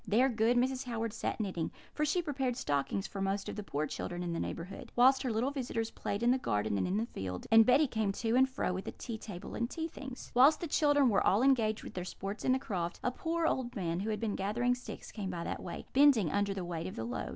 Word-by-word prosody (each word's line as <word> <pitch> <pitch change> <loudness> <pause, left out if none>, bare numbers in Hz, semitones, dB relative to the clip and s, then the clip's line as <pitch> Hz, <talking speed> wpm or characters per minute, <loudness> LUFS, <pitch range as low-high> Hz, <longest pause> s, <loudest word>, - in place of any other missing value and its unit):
There 245 +6 +4
good 230 +1 +2
Mrs. 260 +1 +1
Howard 230 -2 -3
sat 230 - -3
knitting 185 -6 -2 0.2
(for 300 - 0
she 345 +4 +1
prepared 265 -5 -1
stockings 145 +7 -1
for 195 - -5
most 195 +1 -1
of - - -4
the 210 - -4
poor 155 -6 -2
children 175 +4 -4
in 175 -1 -2
the 165 - -2
neighbourhood), 175 +3 -6
whilst 260 +2 +6
her 255 - -1
little 235 +5 0
visitors 235 -5 -3
played 205 +3 -3
in 240 - +5
the 260 - +2
garden 105 - 0
and - - 0
in 185 +3 0
the 225 - 0
field, 95 - -5
and 225 0 +8
Betty 280 +5 +6
came 220 -6 0
to 225 +3 0
and 265 +1 +5
fro 260 -8 -1
with 190 +1 -4
the - - -5
tea 230 -3 -6
table 190 -6 -8
and 235 0 -1
tea 325 -1 -3
things. 270 -5 -9
"Whilst 270 +5 +6
the - - -3
children 290 -3 +3
were 200 - +3
all 205 +6 +3
engaged 225 -5 +3
with - - -8
their 180 - -4
sports 195 +3 -6
in - - +2
the 260 - +4
croft, 180 -10 -3
a 250 - +1
poor 330 +5 -1
old 255 -6 -1
man, 170 -3 -1
who 205 +3 -2
had 215 - -1
been 225 -3 -1
gathering 235 +6 +1
sticks, 245 0 -8
came 200 -3 -4
by 175 -2 -4
that - - -4
way, - - -6
bending 260 - +5
under 200 -1 0
the 185 -2 -3
weight 170 0 -4
of 185 - -7
the 110 - -4
load. 120 - -4
225 Hz, 265 wpm, -32 LUFS, 190-260 Hz, 0.2 s, and